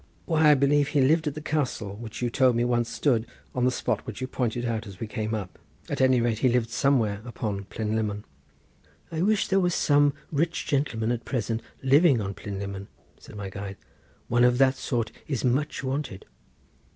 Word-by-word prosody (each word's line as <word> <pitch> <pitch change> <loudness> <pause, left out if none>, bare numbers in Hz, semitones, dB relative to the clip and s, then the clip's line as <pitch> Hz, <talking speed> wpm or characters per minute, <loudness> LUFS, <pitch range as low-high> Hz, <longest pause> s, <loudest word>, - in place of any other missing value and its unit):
"Why, 160 -2 +4
I 150 - +7
believe, 140 +1 +3
he 145 - +2
lived 155 +4 +3
at 145 - -2
the 155 - -5
castle, 130 -10 -2
which 115 +2 -7
you 120 - 0
told 130 -1 +4
me 120 +1 +2
once 120 -1 +1
stood 120 -6 +1 0.3
on 125 -1 +1
the - - +5
spot 125 - -2
which 110 - -6
you 130 - -2
pointed 120 -2 -2
out 115 -2 -2
as 95 -2 -11
we - - -3
came 110 +1 -3
up. 95 -4 -6 0.3
At - - -1
any 130 -1 +5
rate, 115 -2 0
he 130 - +3
lived 120 -1 +1
somewhere 115 -7 +1
upon 105 -4 -4
Plynlimmon." 105 -1 -2 0.9
"I 160 0 -2
wish 210 +2 +2
there 195 - +3
was 180 -2 +1
some 145 -1 +4
such - - -26
rich 165 +1 0
gentleman 120 -5 0
at 120 -1 -2
present 115 -3 -2 0.2
living 140 0 +5
on 100 -2 -3
Plynlimmon," 100 0 -6 0.3
said - - -13
my 100 -2 -6
guide; 100 0 -6 0.5
"one 120 +1 +3
of 125 0 +4
that 130 0 +5
sort 120 -5 -2 0.2
is 135 -3 -2
much 140 +4 0
wanted." 135 -7 -3
120 Hz, 200 wpm, -26 LUFS, 110-140 Hz, 0.9 s, I